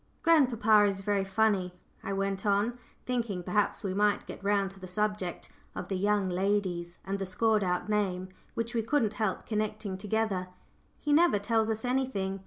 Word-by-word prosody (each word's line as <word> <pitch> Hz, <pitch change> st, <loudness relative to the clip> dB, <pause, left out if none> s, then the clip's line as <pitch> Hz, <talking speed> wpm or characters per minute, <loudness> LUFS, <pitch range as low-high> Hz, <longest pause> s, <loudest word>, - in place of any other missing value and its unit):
"Grandpapa 235 Hz, -10 st, +5 dB
is 195 Hz, 0 st, -4 dB
very 200 Hz, 0 st, +1 dB
funny," 195 Hz, -2 st, +1 dB, 0.3 s
I -, -, -3 dB
went 195 Hz, 0 st, -1 dB
on, 210 Hz, +4 st, +1 dB, 0.3 s
thinking, 230 Hz, -7 st, -2 dB
perhaps, 195 Hz, +3 st, 0 dB
we 190 Hz, -2 st, -1 dB
might 205 Hz, +1 st, +2 dB
get -, -, -9 dB
round 200 Hz, -1 st, +1 dB
to 195 Hz, -, -14 dB
the 185 Hz, -, -8 dB
subject 205 Hz, -1 st, -2 dB, 0.3 s
of 180 Hz, -, -5 dB
the 195 Hz, -, -1 dB
"young 205 Hz, +1 st, +1 dB
ladies" 180 Hz, -2 st, -1 dB
and 195 Hz, +1 st, -2 dB
the 195 Hz, -, -2 dB
scored 215 Hz, +2 st, +2 dB
out 180 Hz, +1 st, -1 dB
name, 190 Hz, -3 st, 0 dB, 0.3 s
which 230 Hz, +1 st, -2 dB
we 230 Hz, -, +1 dB
couldn't 225 Hz, -2 st, +1 dB
help 205 Hz, -4 st, -1 dB
connecting 215 Hz, -3 st, -2 dB
together; 210 Hz, -3 st, -1 dB, 0.5 s
"he 295 Hz, -, 0 dB
never 330 Hz, -7 st, +5 dB
tells 220 Hz, +2 st, +1 dB
us 220 Hz, +2 st, -2 dB
anything. 245 Hz, -7 st, -1 dB
205 Hz, 175 wpm, -30 LUFS, 190-220 Hz, 0.5 s, Grandpapa